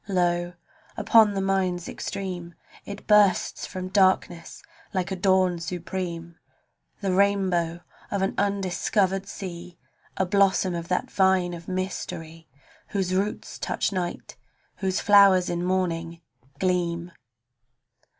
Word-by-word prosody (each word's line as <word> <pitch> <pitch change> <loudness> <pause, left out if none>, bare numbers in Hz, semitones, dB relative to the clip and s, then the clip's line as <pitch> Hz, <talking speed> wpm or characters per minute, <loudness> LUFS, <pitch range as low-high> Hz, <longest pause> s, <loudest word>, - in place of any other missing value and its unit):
Lo! 175 -2 0 0.4
upon 220 -3 +5
the 195 - 0
mind's 185 -2 0
extreme 180 -3 -5 0.3
It 200 0 -8
bursts 210 -3 +3
from 185 -1 -6
darkness 185 -3 +1 0.3
like 185 +1 -1
a - - -1
dawn 185 -1 +2
supreme 170 0 -5 0.3
— - - -43
The 195 -2 0
rainbow 185 -4 +1 0.3
of 200 -1 -1
an 195 - 0
undiscovered 195 0 0
sea, 180 -4 -8 0.4
A 190 - +2
blossom 190 -1 +2
of 170 -1 -4
that 180 - -1
vine 190 -2 +2
of 170 0 -9
mystery 165 -3 -5 0.4
Whose 190 -2 -1
roots 195 +3 -2
touch - - -1
night, 180 -2 -4 0.4
whose 190 0 -1
flowers 195 -3 +5
in 175 0 -2
morning 170 -2 -1 0.4
gleam. 175 -1 -1
185 Hz, 120 wpm, -25 LUFS, 175-195 Hz, 0.4 s, upon